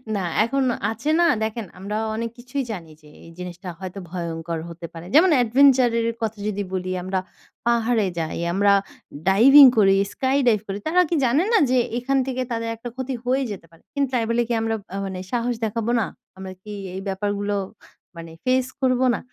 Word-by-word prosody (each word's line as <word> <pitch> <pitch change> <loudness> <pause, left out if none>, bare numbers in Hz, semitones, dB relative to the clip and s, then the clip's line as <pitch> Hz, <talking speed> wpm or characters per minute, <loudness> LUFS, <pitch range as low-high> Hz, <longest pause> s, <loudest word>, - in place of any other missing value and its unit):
না, - - 0 0.3
এখনও 260 0 0 0.2
আছে 290 +7 -4
না 345 - +5 0.2
দেখেন 220 0 -3
আমরা 205 +3 -4 0.2
অনেক 230 +1 -3
কিছুই 250 +3 -4
জানি 170 -6 -7
যে, 150 - -18 0.2
এই 165 - -13
জিনিসটা 180 0 -7
হয়তো 190 +1 -7
ভয়ংকর 170 -1 -4
হতে 170 0 -8
পারে। 165 0 -9
যেমন 345 +5 +7
এডভেঞ্চার 255 +1 +5
এর 230 - 0
কথা 220 -1 -2
যদি 205 -1 -2
বলি 185 0 -2
আমরা 185 0 -1 0.5
পাহাড়ে 235 -2 +2
যাই, 160 -1 -3 0.2
আমরা 200 +1 +3 0.6
ডাইভিং 270 +9 +9
করি, 195 -2 +5 0.2
স্কাই 265 +1 0
ডাইভ 220 -3 +4
করি 195 0 -3
তারা 355 +3 +4
কি 340 - +1
জানে 265 +7 +3
না - - +6
যে 255 - +3 0.2
এখান 270 +3 0
থেকে 255 -1 -2
তাদের 230 0 -2
একটা 230 +2 -8
ক্ষতি 260 +1 -4
হয়ে 260 +2 +1
যেতে 195 -4 -8
পারে। 165 - -21
কিন্তু 280 -2 0
তাই 240 -2 +2
বলে 235 +1 +2
কি 240 - -1
আমরা 225 0 0 0.2
আ - - -2
মানে 190 -1 -5
সাহস 245 0 0
দেখাবো 225 +1 -2
না? 220 - +1 0.3
আমরা 190 0 -7
কি 210 - -10 0.2
এই 190 - -4
ব্যাপারগুলো 205 +1 -2 0.6
মানে 165 -1 -9
ফেস 255 0 +2
করব 255 -1 +2
না? - - -2
225 Hz, 195 wpm, -23 LUFS, 190-255 Hz, 0.6 s, ডাইভিং